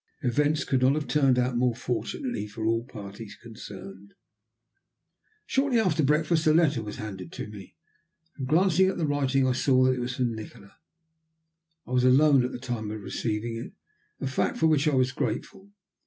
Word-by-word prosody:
Events 145 +4 +1
could 130 -2 0
not 130 +2 +4
have 155 -1 -2
turned 135 -2 +3
out 125 0 +1
more 125 -1 +2
fortunately 125 - -3
for 110 +1 -6
all 115 +1 +1
parties 105 -3 -9
concerned. 100 -3 -11 1.3
Shortly 265 -3 +1
after 175 -7 +2
breakfast 155 +3 +2
a 155 - +6
letter 155 -7 +3
was 105 -1 -6
handed 95 -5 -7
to - - -5
me, 105 -2 -11 0.6
and, 135 -3 -5
glancing 185 +4 +4
at - - -3
the 165 - 0
writing, 135 -2 +1
I 130 - +2
saw 130 +1 +3
that 130 0 +4
it 130 - -4
was 125 0 -3
from 125 -3 0
Nikola. 110 -2 -10 1.1
I - - -12
was 125 -1 +2
alone 135 +1 +5
at 125 - -2
the - - -5
time 120 -4 -4
of 110 0 -5
receiving 110 +2 -3
it, 115 - -8 0.5
a - - -4
fact 130 0 -1
for 160 - +2
which 155 -1 +3
I 150 - +2
was 130 0 +2
grateful. 190 +8 -4
130 Hz, 185 wpm, -27 LUFS, 115-150 Hz, 1.3 s, a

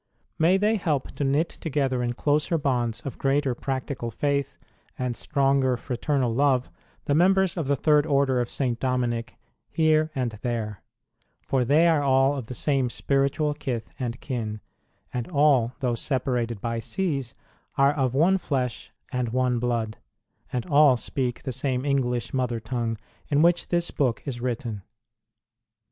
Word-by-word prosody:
May 170 +4 +5
they 210 +3 +2
help 150 -8 -1
to - - -4
knit 140 +5 +2
together 135 -5 -1
in 120 0 -1
closer 150 +5 +1
bonds 120 -5 -1
of 135 - -7
greater 135 -1 +1
practical 130 -1 -3
faith 140 +3 -1 0.4
and 125 -2 -2
stronger 135 -3 +1
fraternal 125 0 -1
love 130 -1 +2 0.3
the 145 - +1
members 190 +3 +3
of 160 -6 -2
the 140 - +3
Third 150 +2 +3
Order 140 -3 +2
of 120 - -3
St. 125 -4 -1
Dominic 120 -3 -1 0.3
here 155 -1 +3
and 125 -3 -1
there; 110 -4 -3 0.6
for 130 -2 +1
they 150 +7 +4
are 160 -3 +3
all 135 0 +3
of 130 -5 -5
the 125 - -6
same 135 -3 +1
spiritual 140 +4 0
kith 130 -6 -4
and 120 -2 -3
kin, 110 -5 -4 0.5
and 125 -2 -3
all, 140 -7 +3
though 125 -2 +1
separated 120 -3 -1
by 115 +2 -2
seas, 135 - -2 0.4
are 140 +1 +5
of 130 -4 0
one 180 +7 +4
flesh 130 -7 -3 0.2
and 125 -3 -1
one 125 0 +1
blood, 115 -3 -1 0.5
and 125 - -2
all 145 -5 +5
speak 125 +1 -3
the 130 - -3
same 130 +1 -2
English 125 -4 0
mother 125 -3 0
tongue 115 0 -2 0.3
in 145 +1 +3
which 175 +1 +3
this 175 -1 0
book 130 -5 0
is 125 -4 -5
written. 115 -4 -3
130 Hz, 155 wpm, -25 LUFS, 120-145 Hz, 0.6 s, May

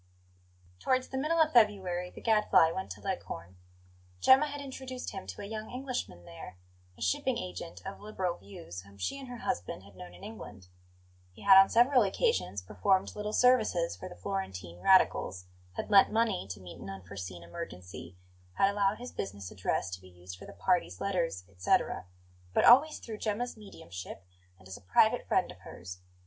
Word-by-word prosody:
TOWARDS 255 - +1
the 265 - -4
middle 320 +4 +1
of 315 -1 +4
February 190 -6 +3
the - - -13
Gadfly 210 -7 +4
went 190 +2 -4
to - - -16
Leghorn. 95 - -5 0.6
Gemma 270 - +6
had 290 0 -6
introduced 260 -2 -6
him - - -7
to 95 - -7
a - - -5
young 215 +1 -6
Englishman 250 - -5
there, 85 +2 -10 0.4
a - - -5
shipping 90 - +1
agent 90 -1 -7
of - - -6
liberal 190 -4 -3
views, 95 -3 -9
whom 100 +1 -17
she 95 - -3
and 270 - -9
her 245 0 -7
husband 90 - -3
had 100 -1 -16
known 90 -1 -10
in 90 - -15
England. 105 -4 -10 0.6
He - - -14
had 200 -1 +8
on 195 - +3
several 250 +2 +5
occasions 200 - 0
performed 105 - +1
little 210 0 -3
services 215 - +3
for 90 - -8
the - - -10
Florentine 90 -1 -5
radicals: 95 - +3 0.3
had 90 - -5
lent 195 -1 +7
money 220 - +1
to 95 -1 -6
meet 90 -2 -11
an - - -8
unforeseen 95 -2 -7
emergency, 90 - -8 0.4
had 195 - +3
allowed 200 0 +1
his 245 +1 -8
business 100 -1 -6
address 95 0 -1
to 90 0 -6
be 95 - -14
used 90 0 -10
for - - -12
the - - -10
party's 90 +2 0
letters, 170 - -1
etc.; 90 -1 0 0.5
but - - +4
always 295 +6 +7
through 220 -2 -8
Gemma's 225 +3 -2
mediumship, 95 - -9 0.3
and 95 - -17
as 95 - -7
a - - -16
private 90 -1 +3
friend - - +1
of - - -14
hers. 90 +1 -9
165 Hz, 180 wpm, -31 LUFS, -, 0.6 s, had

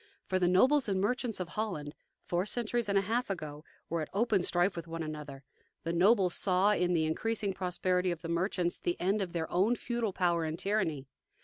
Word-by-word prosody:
For 185 - 0
the 180 - +3
nobles 255 +8 +4
and 190 -1 +1
merchants 225 +2 -1
of 180 -2 -4
Holland, 180 -10 -3 0.3
four 180 +3 -1
centuries 235 0 -1
and 200 - +3
a - - +4
half 230 +5 -1
ago, 155 -5 -5 0.2
were 165 0 -1
at 155 - -5
open 210 -1 +2
strife 175 +2 +1
with 170 -1 -6
one 165 0 -4
another. 150 -3 -7 0.4
The 165 - -2
nobles 185 +1 +4
saw 190 +2 +3
in 180 -3 +1
the 160 -2 +2
increasing 205 +5 -1
prosperity 180 0 0
of 175 0 -4
the - - -4
merchants 175 +1 0
the 175 - -2
end 195 +4 +1
of 185 -3 -3
their 165 -2 -2
own 200 +7 +3
feudal 235 -3 -2
power 175 -3 +1
and 160 0 -3
tyranny. 180 -10 -1
185 Hz, 205 wpm, -31 LUFS, 170-210 Hz, 0.4 s, nobles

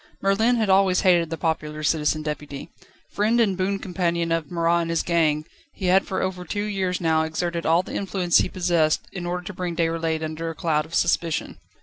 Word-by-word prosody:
Merlin 220 +5 +2
had 220 -3 +1
always 190 -1 +4
hated 175 -3 +3
the 165 - -4
popular 155 -2 -2
Citizen 155 0 +1
Deputy. 150 -2 -6 0.4
Friend 220 +3 +1
and 205 -5 +3
boon 190 +2 -1
companion 170 -3 -1
of 165 -3 -1
Marat 170 0 +1
and 165 - -3
his 165 -1 0
gang, 155 -3 +1 0.3
he 190 - -6
had 185 +2 +3
for 190 - -2
over 185 -1 -3
two 205 +3 -3
years 190 -3 -1
now 160 -2 +2
exerted 170 +2 -2
all 165 +3 +4
the - - -9
influence 185 -3 +1
he - - 0
possessed 170 -4 +1
in 175 -2 -5
order 180 0 -3
to 205 +3 -7
bring 180 -2 -4
Déroulède 165 -1 -1
under 160 +1 -4
a 165 - -6
cloud 150 -1 0
of 165 - -6
suspicion. 170 -2 0
170 Hz, 205 wpm, -24 LUFS, 160-185 Hz, 0.4 s, always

